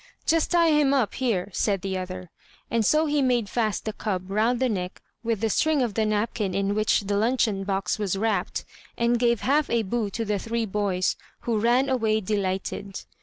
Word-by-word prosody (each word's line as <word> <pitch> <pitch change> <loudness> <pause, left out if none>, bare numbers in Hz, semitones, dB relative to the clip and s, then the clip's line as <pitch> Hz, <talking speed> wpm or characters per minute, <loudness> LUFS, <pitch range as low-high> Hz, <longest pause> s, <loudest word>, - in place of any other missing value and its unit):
"Just 330 -1 +2
tie 340 -2 +4
him 290 -2 +3
up 250 -6 +1
here," 210 -7 -1
said 195 -2 0
the 190 -1 -2
other; 185 -1 -6 0.4
and 230 -1 +2
so 305 +9 +3
he 295 -1 +1
made 245 -5 +2
fast 215 -1 -1
the 220 - -2
cub 190 -3 -3
round 225 +4 +2
the 260 - +2
neck 185 -5 -3 0.2
with 225 -3 -1
the 225 - +1
string 310 +1 +2
of 230 -4 -2
the 220 +1 +1
napkin 210 -2 -1
in 200 0 0
which 215 +1 +2
the 200 0 -2
luncheon 220 -3 +1
box 195 0 -1
was 200 -2 -1
wrapped, 220 +2 -1 0.3
and 235 0 +2
gave 235 -2 +2
half 290 +3 +2
a 235 -1 +1
bu 220 +1 -1
to 225 +3 -3
the 205 -1 -1
three 230 +2 -2
boys, 195 -3 0 0.2
who 230 -3 0
ran 240 +4 +3
away 225 -5 +1
delighted. 195 -1 -3
220 Hz, 200 wpm, -25 LUFS, 195-240 Hz, 0.4 s, tie